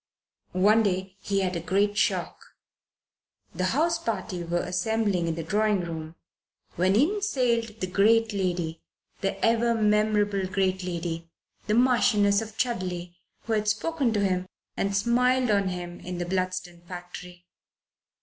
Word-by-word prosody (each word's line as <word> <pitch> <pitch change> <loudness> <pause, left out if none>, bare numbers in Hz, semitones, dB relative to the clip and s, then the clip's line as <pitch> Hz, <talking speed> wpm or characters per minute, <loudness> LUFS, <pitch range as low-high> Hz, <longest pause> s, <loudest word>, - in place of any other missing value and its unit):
One 205 +5 +4
day 190 -2 -1
he 195 0 -1
had 185 -1 -1
a - - -1
great 200 +5 +1
shock. - - -1 1.0
The 185 - -1
house 325 - +1
party 205 - -3
were 175 +1 -1
assembling 185 0 0
in 165 - -1
the 165 - -4
drawing 210 +3 +1
room, 165 -1 -6 0.6
when 185 +3 +2
in 350 - +2
sailed 235 - 0
the - - +1
great 220 +4 +3
lady, 175 -4 -2 0.4
the 195 - -2
ever 230 +1 +3
memorable 210 -2 +2
great 190 0 0
lady, 170 -2 -4 0.4
the 210 - +2
Marchioness 220 -4 +4
of 220 -1 -8
Chudley, 180 -7 -2 0.3
who 230 - -2
had 215 -1 0
spoken 265 +4 0
to 205 - +1
him 185 -1 0 0.3
and 195 0 0
smiled 250 +2 +2
on 200 -2 +2
him 175 -1 -5
in 180 0 -6
the 175 - -2
Bludston 185 -1 -3
factory. 180 0 -9
195 Hz, 145 wpm, -26 LUFS, 180-225 Hz, 1.0 s, One